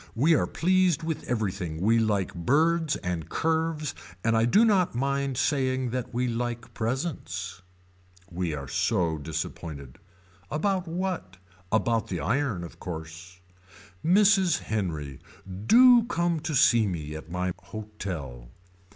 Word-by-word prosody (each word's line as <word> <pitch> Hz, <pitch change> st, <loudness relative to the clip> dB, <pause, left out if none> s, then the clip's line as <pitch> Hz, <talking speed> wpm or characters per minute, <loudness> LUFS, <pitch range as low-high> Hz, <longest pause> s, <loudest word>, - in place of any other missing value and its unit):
We 150 Hz, +8 st, +4 dB
are -, -, +2 dB
pleased 180 Hz, -2 st, +2 dB
with 160 Hz, -1 st, -3 dB
everything. 95 Hz, -8 st, -2 dB
We 110 Hz, +5 st, +3 dB
like 105 Hz, -4 st, 0 dB
birds 155 Hz, -, +2 dB
and 85 Hz, -3 st, -4 dB
curves 160 Hz, -2 st, -1 dB, 0.3 s
and 115 Hz, 0 st, +2 dB
I 115 Hz, 0 st, +3 dB
do 205 Hz, -, +5 dB
not 190 Hz, -, +2 dB
mind 140 Hz, 0 st, -1 dB
saying 130 Hz, -3 st, 0 dB
that 125 Hz, 0 st, -3 dB
we 125 Hz, +1 st, 0 dB
like 120 Hz, 0 st, -3 dB
presents. 110 Hz, -, -3 dB, 0.7 s
We 85 Hz, -3 st, -2 dB
are 70 Hz, -1 st, -6 dB
so 85 Hz, -, 0 dB
disappointed. 75 Hz, -3 st, -6 dB, 0.5 s
About 185 Hz, +4 st, 0 dB
what. 170 Hz, -, -3 dB, 0.3 s
About 115 Hz, 0 st, +1 dB
the 90 Hz, -, -3 dB
iron 110 Hz, -, 0 dB
of 85 Hz, -, -10 dB
course. 85 Hz, +2 st, -8 dB, 0.6 s
Mrs. 190 Hz, -1 st, +4 dB
Henry. 80 Hz, -10 st, -3 dB, 0.5 s
Do 245 Hz, 0 st, +8 dB
come 170 Hz, -7 st, 0 dB
to 155 Hz, 0 st, -3 dB
see 115 Hz, -4 st, +5 dB
me 80 Hz, -5 st, -4 dB
at 80 Hz, +1 st, -9 dB
my 90 Hz, +1 st, -2 dB
hotel. 90 Hz, -, -7 dB
115 Hz, 130 wpm, -27 LUFS, -, 0.7 s, Do